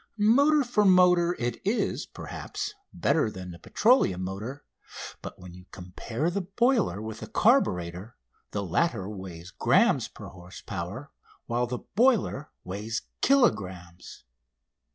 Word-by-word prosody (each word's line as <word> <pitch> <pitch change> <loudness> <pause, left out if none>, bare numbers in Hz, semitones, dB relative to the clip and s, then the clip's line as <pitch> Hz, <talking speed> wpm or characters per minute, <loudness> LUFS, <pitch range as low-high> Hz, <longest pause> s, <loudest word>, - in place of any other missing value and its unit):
Motor 280 +8 +4
for 240 -4 +1
motor 180 -2 +5
it 120 -1 -3
is, 210 +5 -1
perhaps, - - -6 0.2
better 150 -7 +1
than 95 -3 -8
the 85 - -11
petroleum 210 - +2
motor, 105 +10 -6 0.6
but - - -8
when 90 -1 -11
you 90 0 -13
compare 115 - -4
the 200 +2 -1
boiler 215 - +1
with 110 0 -6
the - - -7
carburator 95 - +1 0.4
the 100 - -3
latter 100 - 0
weighs 95 -4 -8
grammes - - +3
per - - -12
horse 90 0 -12
power 100 - -6 0.3
while 120 +1 0
the 125 0 -4
boiler 225 - +2
weighs 105 +5 -4 0.2
kilogrammes. 95 - 0
120 Hz, 130 wpm, -27 LUFS, -, 0.6 s, motor